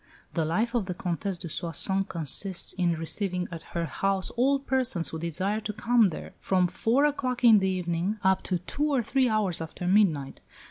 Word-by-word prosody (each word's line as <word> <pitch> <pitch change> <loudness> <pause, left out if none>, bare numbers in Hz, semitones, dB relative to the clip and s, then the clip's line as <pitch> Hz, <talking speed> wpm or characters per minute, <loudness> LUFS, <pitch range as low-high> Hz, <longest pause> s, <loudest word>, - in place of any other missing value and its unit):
The 165 -2 0
life 215 +10 0
of 230 -6 0
the 180 - -3
Comtesse 180 +2 -3
de 170 - -6
Soissons 185 +4 -1
consists 175 +3 -2
in 175 -2 +1
receiving 180 +2 -2
at 165 -2 -6 0.2
her 170 - 0
house 195 +5 -1
all 270 +4 +2
persons 260 -10 0
who 160 - -5
desire 185 +6 -1
to 210 0 -4
come 225 0 +3
there, 165 - -8
from 185 -1 +2
four 235 +10 +2
o'clock 255 -4 -1
in 225 -3 +8
the 190 0 +1
evening 180 +2 -1
up 190 0 +3
to 185 - 0
two 290 - -2
or 260 -4 +2
three 260 +3 +2
hours 205 -6 +1
after 165 +2 -6
midnight. 175 -8 +2
190 Hz, 190 wpm, -27 LUFS, 170-225 Hz, 0.2 s, in